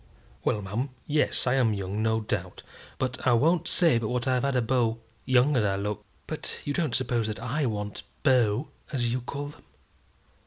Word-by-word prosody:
"Well, 105 - 0
ma'am 110 +8 -2 0.2
yes; 150 0 +2
I 125 - +3
am 120 -5 +3
young, 100 +2 -3
no 110 0 +2
doubt. 95 -4 -4 0.3
But 130 0 -2
I 120 - +6
won't 160 +7 +3
say 165 -11 +4
but 115 - -2
what 125 +3 -1
I've 130 -1 +2
had 140 0 0
a 125 - +3
beau, 115 -2 +1 0.3
young 130 +3 +4
as 120 - +3
I 100 -2 +1
look." 100 +1 -3 0.2
"But - - -3
you 145 - -1
don't 150 -6 0
suppose 120 -3 0
that 110 - -4
I 130 +4 -1
want 105 -2 -3 0.2
beaux, 125 -2 +3 0.2
as 120 -4 0
you 125 - -1
call 140 +3 -5
them?" 145 - -15
125 Hz, 195 wpm, -27 LUFS, 110-135 Hz, 0.3 s, I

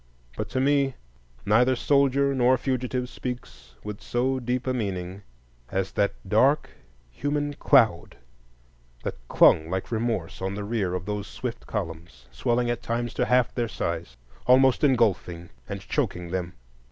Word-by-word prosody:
But - - -4
to 130 - -1
me 140 0 +2 0.5
neither 125 +5 +4
soldier 140 +1 +2
nor 130 0 +4
fugitive 125 -1 -2
speaks 125 - -7
with 105 -1 -6
so 130 +2 0
deep 125 +1 -2
a 130 - 0
meaning 95 -5 -3 0.5
as 95 0 -1
that 100 - 0
dark 130 +10 +3 0.4
human 145 - -2
cloud 115 - +3 0.9
that - - -2
clung 80 +5 +5
like 95 +4 -3
remorse 110 -8 -2
on 95 +1 -2
the 105 - -4
rear 100 -4 -1
of 90 0 -4
those 105 0 -3
swift 125 -2 -6
columns, 85 - -6
swelling 120 0 0
at 120 0 -3
times 120 0 -2
to - - 0
half 125 -2 +2
their 120 -2 -1
size, 85 - -4 0.3
almost 130 +1 +5
engulfing 105 - +1 0.2
and - - -4
choking 90 -1 -2
them. 90 -1 -3
120 Hz, 145 wpm, -26 LUFS, 95-130 Hz, 0.9 s, clung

